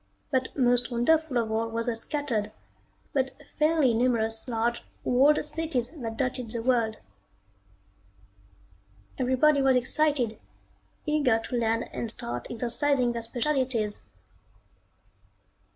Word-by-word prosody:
But 260 0 -1
most 245 -2 +3
wonderful 270 +3 +2
of 225 -2 0
all 225 +1 0
were 230 0 -2
the 235 -1 -1
scattered, 230 -4 -2 0.6
but 265 -1 0 0.2
fairly 305 -5 +4
numerous 225 -1 +1
large, 235 0 0 0.2
walled 280 +5 +4
cities 300 -5 -2
that 230 -8 -6
dotted 255 -3 -2
the 225 0 -4
world. 230 -3 +1 2.2
Everybody 265 +3 +3
was 265 -1 +4
excited, 250 -2 +1 0.7
eager 295 -7 +3
to 225 +3 -5
land 230 -1 0
and 235 - -3
start 120 - -5
exercising 245 +2 +1
their 235 0 -3
specialties. 240 -3 -1
245 Hz, 110 wpm, -27 LUFS, 230-275 Hz, 2.2 s, fairly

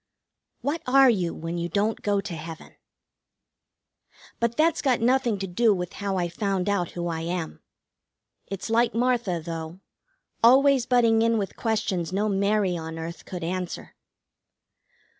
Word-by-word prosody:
What 300 +4 -2
are 265 0 +6
you 180 -6 -1
when 165 +1 -5
you 170 0 -3
don't 205 +5 0
go 205 -1 +1
to 195 -3 -6
heaven? 160 +1 -9 1.7
But 235 0 0
that's 320 +1 +3
got 260 -4 +2
nothing 240 -2 +2
to 195 - -3
do 205 +4 +2
with 180 -1 -5
how 200 -1 -3
I 175 -1 0
found 195 +1 -2
out 200 -4 0
who 175 -1 -4
I 165 -1 -2
am. 170 -1 -4 0.9
It's 195 +3 -5
like 235 0 +2
Martha, 235 -7 +1
though: 165 +1 -6 0.6
always 265 +1 +5
butting 230 -3 +4
in 230 0 +3
with 200 -2 -3
questions 210 -7 -1
no 205 +3 0
Mary 200 -1 +1
on 160 -1 -6
earth 165 +1 -7
could 180 -2 -6
answer. 180 +1 -4
200 Hz, 150 wpm, -25 LUFS, 175-230 Hz, 1.7 s, are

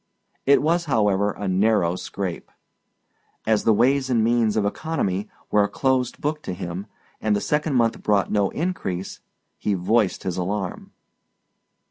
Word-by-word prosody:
It 140 +1 +5
was, 170 +2 +2
however, 105 -7 +2
a 100 - -5
narrow 95 -2 +2
scrape; 90 -1 -5 1.0
as 110 -1 +2
the 115 - +5
ways 130 +5 +3
and 115 -3 +3
means 115 -2 +2
of 105 - +2
economy 105 - -2 0.2
were 105 -1 +4
a 100 - 0
closed 130 -2 0
book 150 +1 -2
to 95 - -5
him 90 +2 -5 0.3
and 110 -1 +2
the - - +1
second 150 +4 0
month 115 -2 +2
brought 100 -2 +1
no 100 -2 +2
increase, 145 - -3 0.4
he 105 - 0
voiced 100 +3 +1
his 90 -1 -3
alarm. 95 +1 -3
105 Hz, 150 wpm, -23 LUFS, 95-130 Hz, 1.0 s, It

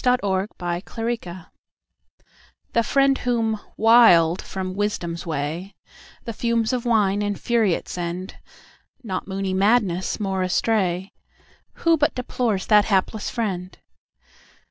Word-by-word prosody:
Remorseful 205 -7 +1
Apology 185 +4 -3 1.4
THE 230 - +3
FRIEND 275 +3 +2
whom, 225 -3 0 0.2
wild 190 -7 +6
from 185 -1 -5
Wisdom's 180 -4 -3
way, 165 +6 -4 0.5
The 230 - -5
fumes 235 0 0
of 245 -1 -2
wine 205 -3 +2
infuriate 205 -1 0
send,(Not 185 +4 -7
moony 190 -1 -3
madness 195 -2 +1
more 195 -2 -1
astray)Who 190 - -2
but 295 - +1
deplores 235 -5 -1
that 210 -2 +5
hapless 200 +1 0
friend? 185 -5 -4
205 Hz, 100 wpm, -23 LUFS, 185-230 Hz, 1.4 s, wild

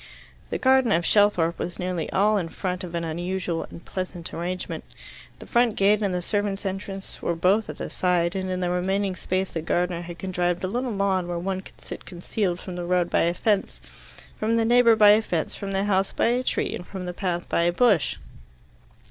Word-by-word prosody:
The - - -1
garden 260 -3 +4
of 170 -3 +2
Shelthorpe 190 -5 +3
was 175 - -4
nearly 180 -2 -2
all 210 +1 +3
in 165 -3 -4
front 185 +2 -3
an 170 -1 -3
unusual 175 +1 -2
and 170 - -12
pleasant 180 -2 -5
arrangement. 180 +2 -4 0.5
The - - -11
front 240 -3 +2
gate 205 +2 +3
and 200 -2 +1
the 180 -1 -2
servants' 205 0 -1
entrance 195 0 -5
were 170 - 0
both 190 +6 +2
at - - -6
the - - -4
side, 175 -1 +1
and 190 -1 -2
in 185 0 -2
the 175 -1 0
remaining 190 +2 0
space 185 +1 -2
the 165 - -3
gardener 175 +1 0
had 175 0 -8
contrived 180 -1 -1
a - - +1
little 245 +6 -2
lawn 195 -3 0
where 175 -1 -2
one 190 +2 -2
could - - -16
sit - - -9
concealed 180 0 -2
from 180 -1 -7
the 175 - -3
road 175 -1 +1
by - - +3
a 170 +1 +2
fence, 205 +1 0 0.6
from 220 +2 +1
the 225 - +2
neighbour 235 -1 +6
by 210 -1 +8
a 215 +1 +5
fence, 170 -7 -2
from 200 -1 -5
the 195 0 0
house 195 -1 +1
by - - +1
a 245 +1 +2
tree, - - -1
and 175 - -6
from 190 -2 -6
the 180 - -4
path 175 -1 -2
by - - +1
a 170 +1 +3
bush. 195 - +3
185 Hz, 215 wpm, -25 LUFS, 175-205 Hz, 0.6 s, by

